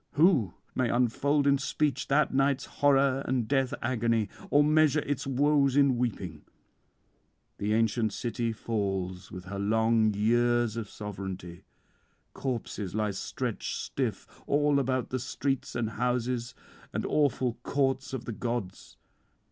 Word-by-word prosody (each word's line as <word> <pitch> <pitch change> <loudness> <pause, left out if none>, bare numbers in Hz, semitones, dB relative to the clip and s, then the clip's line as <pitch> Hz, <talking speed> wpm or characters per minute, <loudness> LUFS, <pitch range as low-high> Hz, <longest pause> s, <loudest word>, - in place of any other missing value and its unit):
Who 150 - +3 0.2
may 125 -2 +1
unfold 135 +4 +2
in 140 -1 +4
speech 140 -1 -1
that 150 +1 +2
night's 135 0 +2
horror 135 -1 +2
and 125 -3 0
death 135 -1 +1
agony, 115 -4 +1 0.2
or 145 +1 +5
measure 155 0 +4
its 140 -2 -3
woes 140 0 +3
in 140 -3 +5
weeping? 95 -10 -3 1.2
The 100 - -2
[363 115 +1 +2
397]ancient - - -5
city 115 +1 -2
falls 95 -5 -3
with 90 0 -8
her 100 +1 -5
long 110 +1 +3
years 120 +1 +2
of 115 -3 -4
sovereignty; 95 -4 -7 0.7
corpses 115 -7 -4
lie 105 -1 0
stretched 95 - -3
stiff - - -3 0.2
all 145 0 +3
about 130 -1 -1
the 130 - -1
streets 135 +2 -2
and 115 -2 -1
houses 125 +1 -1 0.4
and - - -2
awful 130 -5 +1
courts 135 0 0
of 130 -3 -5
the - - -4
gods. 115 -5 -4
120 Hz, 135 wpm, -29 LUFS, 110-135 Hz, 1.2 s, or